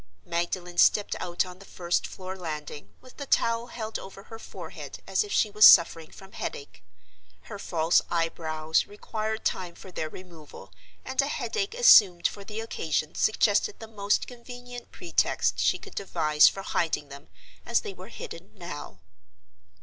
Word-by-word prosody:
Magdalen 175 +1 -3
stepped 210 - +4
out 175 +1 -1
on 180 0 -11
the - - -12
first 175 -2 -2
floor 185 0 -8
landing, 150 -5 -7
with 255 -1 -17
the 280 - -6
towel 230 -1 +1
held 220 -2 -5
over 195 0 -11
her 225 +1 -11
forehead - - -9
as - - +1
if 415 - -9
she 215 - +2
was 210 +1 +2
suffering 165 -4 +8
from 195 0 -14
headache. 140 -9 -7 0.6
Her 205 - -9
false 165 -3 +2
eyebrows 160 -2 0
required 215 +1 -5
time 180 -2 -2
for 190 - -12
their 155 -3 -4
removal, 155 - -13 0.3
and 260 +1 +1
a 275 - -2
headache 410 +7 -3
assumed 195 - +7
for 200 - -9
the 215 +2 -6
occasion 155 -8 -2
suggested 215 - +2
the 225 - -9
most 205 -2 0
convenient 245 0 -10
pretext 355 -2 0
she - - +2
could 405 - -13
devise 155 -6 +3
for 195 - -1
hiding 160 -6 -1
them 140 +1 -11 0.4
as - - +1
they - - -7
were - - -11
hidden - - -9
now. - - -8
190 Hz, 160 wpm, -27 LUFS, 165-225 Hz, 0.6 s, suffering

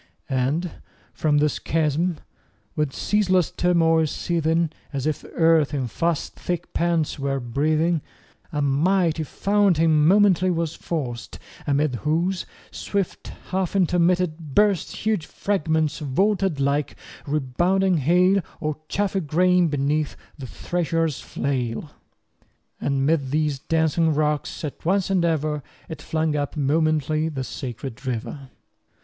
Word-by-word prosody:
And 140 +7 0 0.4
from 150 -2 +1
this 150 -1 +1
chasm, 160 +2 0 0.6
with 150 -3 0
ceaseless 185 0 +1
turmoil 165 -2 +3
seething, 165 0 0 0.2
As 135 -3 -3
if 155 -2 -1
this - - -13
earth 160 -3 +3
in 135 -3 -1
fast 165 +6 -1
thick 175 -2 -4
pants 170 -3 0
were 135 0 -1
breathing, 155 +6 +1 0.5
A 150 -1 -1
mighty 160 +4 +2
fountain 165 -3 +2
momently 190 -1 +4
was 165 -2 -1
forced; 130 -11 -5 0.3
Amid 140 -2 +1
whose 170 +7 -1 0.2
swift 200 -3 -3 0.2
half 190 0 -1
intermitted 175 -4 +1
burst 205 -4 +3
20 - - -8
Huge 215 -7 0
fragments 160 -6 0
vaulted 190 +3 +1
like 140 +1 0 0.3
rebounding 175 +7 +1
hail, 180 +7 +3 0.2
Or 155 -1 -2
chaffy 195 -1 0
grain 180 +2 +3
beneath 145 0 0 0.2
the 135 -4 -8
thresher's 165 - -1
flail: 130 0 -3 0.9
And 135 -1 0
'mid 145 -3 +1
these 150 -1 0
dancing 160 +1 +1
rocks 150 +1 -1
at 150 - -6
once 190 +2 +1
and 185 -3 +2
ever 155 -3 0 0.3
It 160 - -8
flung 155 -1 -1
up 145 +1 -2
momently 155 +1 +1
the 135 -4 -4
sacred 125 0 -7
river. 130 +3 -4
155 Hz, 125 wpm, -23 LUFS, 145-175 Hz, 0.9 s, momently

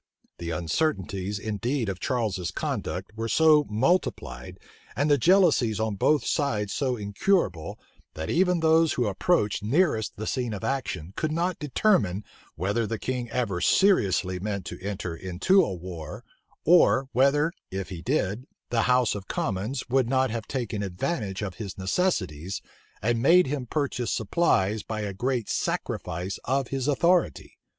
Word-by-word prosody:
The 85 - -5
uncertainties 95 - -1
indeed 115 +4 -2
of 95 -2 -3
Charles's 105 -8 -1
conduct - - -4
were 115 +1 -3
so 155 +3 +5
multiplied, 105 - -1 0.4
and 145 +2 +1
the 145 - +5
jealousies 160 - +4
on 110 -1 0
both 145 +9 +2
sides 110 -9 0
so 130 -3 -1
incurable, 100 - 0 0.4
that 80 +1 -4
even 180 - +2
those 160 0 +4
who 125 - 0
approached 105 - +1
nearest 115 - +1
the 110 - -5
scene 120 -4 -2
of 95 - -8
action, 100 - -3
could 155 -1 -1
not 170 +3 -1
determine, 125 - +1 0.3
whether 100 +7 -1
the 115 - -2
king 125 0 -3
ever 105 -9 -1
seriously 95 - +3
meant 100 -1 -3
to - - -7
enter 95 -4 -4
into 95 - +2
a - - -2
war; 85 -3 -7 0.4
or 145 -6 +5
whether, 145 +6 +3 0.2
if 95 0 -5
he 90 -4 -7
did, 125 - -1 0.2
the 115 -1 +2
house 125 -2 +3
of 100 -2 -7
commons 110 +6 -2
would 130 -1 +2
not 130 -2 +2
have 115 -1 -4
taken 120 -6 -3
advantage 100 - -3
of 95 -3 -5
his 100 -4 -6
necessities, 95 - -1 0.4
and 115 0 +1
made 175 +7 +6
him 135 -2 -3
purchase 135 -4 -1
supplies 110 - +1
by 110 +1 -4
a 100 -2 -3
great 120 +2 -1
sacrifice 90 +4 -3
of 135 0 0
his 135 -1 -2
authority. 170 +4 +1
115 Hz, 150 wpm, -26 LUFS, 95-145 Hz, 0.4 s, made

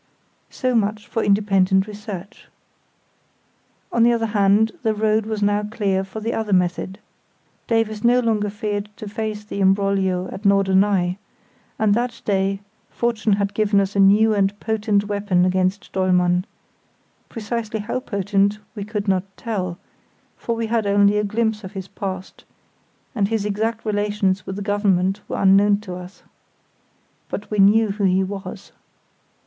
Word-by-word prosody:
So 255 -1 -1
much 210 -2 0
for 225 - -2
independent 195 -2 +3
research. 205 -2 -9 1.4
On 235 - +1
the 235 +1 +6
other 230 -1 +1
hand 210 +1 +3
the 220 -2 0
road 215 0 +1
was 215 -2 -2
now 205 0 +2
clear 205 -3 -1
for 195 +3 -7
the 225 +2 -2
other 220 -2 -1
method. 180 +1 0 0.7
Davies 225 -2 0
no 245 +1 +5
longer 220 -4 0
feared 205 0 -3
to 215 - -7
face 210 0 -4
the 205 - -6
imbroglio 190 -1 +1
at 190 - -7
Norderney; 195 -2 +2 0.6
and 215 -2 +3
that 240 +1 -1
day 195 -1 0 0.3
fortune 230 -3 0
had 200 0 0
given 210 -2 +2
us 195 0 -1
a - - +1
new 210 +3 +5
and 200 0 0
potent 215 -2 0
weapon 200 -3 +1
against 185 +2 0
Dollmann; 180 -1 +2 0.8
precisely 220 -1 -4
how 230 +4 -3
potent 200 -3 0 0.2
we 205 - -5
could 210 0 -4
not 190 -1 +1
tell, 185 -6 -3 0.6
for 235 - -3
we 230 0 -2
had 220 -2 0
only 200 +1 +4
a - - 0
glimpse 215 +1 -1
of 190 - -8
his 190 -2 -6
past, 190 -2 -6 0.7
and 205 -5 +1
his 220 -1 -1
exact 220 +2 -2
relations 205 -2 0
with 190 - -4
the 205 - -5
Government 200 -1 +1
were - - -4
unknown 200 +1 +5
to 190 -4 -7
us. 180 +2 -10 1.1
But 205 - -6
we 210 - -1
knew 210 +3 +5
who 200 0 -1
he 190 0 +3
was. 195 +1 -7
205 Hz, 155 wpm, -21 LUFS, 195-215 Hz, 1.4 s, the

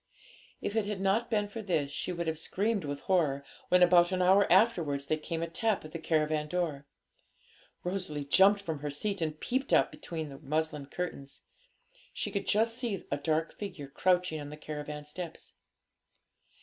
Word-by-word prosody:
If 205 - -3
it 220 -2 +1
had 210 -2 -3
not 195 +5 +1
been 210 -2 +1
for 220 +2 -6
this, 160 -8 0
she 180 - -2
would 170 -1 -3
have 160 -1 -1
screamed 205 +2 0
with 145 0 -4
horror 150 -7 +1 0.3
when, 180 0 +6
about 175 0 +6
an 185 - 0
hour 190 +2 +5
afterwards, 160 -11 +3
there 155 - 0
came 165 +2 -3
a - - -1
tap 200 +3 0
at 155 - -9
the 165 - -5
caravan 155 -1 +1
door. 150 -5 -2 1.0
Rosalie 180 -6 -3
jumped 195 +7 +5
from 160 -5 -3
her 145 +1 -3
seat, 195 +7 -1
and 155 -1 -2
peeped 265 +2 -1
out - - +4
between 160 -3 -6
the 135 - -10
muslin 155 -1 -1
curtains. 145 -4 -5 0.7
She - - -2
could 200 - -3
just 225 +3 +2
see 225 -7 -2
a 140 - +1
dark 160 +2 0
figure 180 -9 -6
crouching 180 +1 +1
on 145 - -7
the 150 - -8
caravan 150 -1 -6
steps. 165 +2 -6
170 Hz, 180 wpm, -31 LUFS, 150-195 Hz, 1.0 s, when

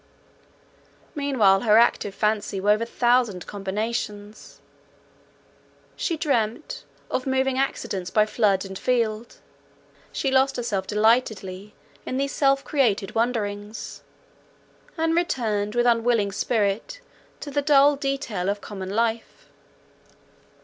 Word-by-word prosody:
Meanwhile 255 -10 +3
her 215 -1 +4
active 215 -4 +2
fancy 210 -2 0
wove 210 +3 +2
a 230 - -2
thousand 240 -6 +1
combinations; 205 +1 -5 1.4
she 335 - -2
dreamt 240 -4 -2 0.3
"of 260 - -2
moving 265 0 +1
accidents 195 -8 -2
by 210 +2 +3
flood 205 -3 +1
and 190 0 -7
field"—she 235 +3 -4
lost 265 +1 +3
herself 215 -6 -2
delightedly 210 -3 0 0.3
in 255 - -4
these 275 +1 -1
self 275 -1 +2
created 220 -9 0
wanderings, 215 -3 -3 1.0
and 325 0 +1
returned 220 -11 -1
with 240 0 +2
unwilling 230 -3 +2
spirit 215 - -1 0.4
to 290 - -7
the 285 - 0
dull 285 0 +5
detail 275 -9 -2
of 205 +1 -1
common 190 -2 -7
life. 225 +2 -2
225 Hz, 110 wpm, -24 LUFS, 205-265 Hz, 1.4 s, dull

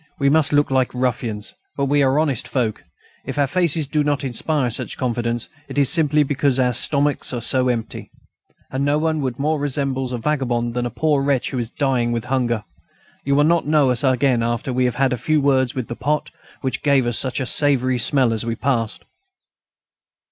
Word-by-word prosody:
We 140 -1 +2
must 160 0 +3
look 145 -1 +2
like 130 -1 +1
ruffians, 120 -4 -2 0.2
but 140 - +1
we 145 +1 +2
are 135 +1 +2
honest 145 -7 0
folk. 120 -5 -2 0.4
If - - -6
our 145 - +3
faces 160 +1 0
do 150 +2 0
not 145 -1 0
inspire 140 +3 -1
much 120 - -3
confidence, 120 -2 -2 0.2
it - - -8
is 140 -2 +4
simply 150 -2 +3
because 140 -1 0
our 125 -1 +2
stomachs 145 +2 0
are 120 - -3
so 130 +1 +1
empty. 115 -2 -4 0.6
And 130 +1 -1
no 145 +1 +2
one 155 0 0 0.2
more 150 +2 0
resembles 135 -2 -2
a 125 - -2
vagabond 120 -3 -1
than 120 0 -1
a - - -4
poor 150 +3 +1
wretch 135 -3 0
who 130 - -2
is 115 -2 -3
dying 125 -3 0
with 115 -2 -2
hunger. 120 -4 -1 0.6
You 140 0 +2
will 145 - +4
not 165 0 +2
know 150 -4 +3
us 125 +1 0
again 130 -2 +2
after 120 +2 -2
we 130 0 +1
have 125 - 0
had 135 -1 +1
a - - -2
few 155 +4 +1
words 135 -1 +1
with 130 -3 -3
the 120 - -5
pot 150 +3 -2 0.3
which 130 -2 -2
gave 140 -4 +3
out 120 - -1
such 130 +2 0
a 130 - -2
savoury 130 -2 +2
smell 125 -1 +2
as 110 - -2
we 115 0 -2
passed." 115 -2 -2
135 Hz, 205 wpm, -21 LUFS, 120-145 Hz, 0.6 s, is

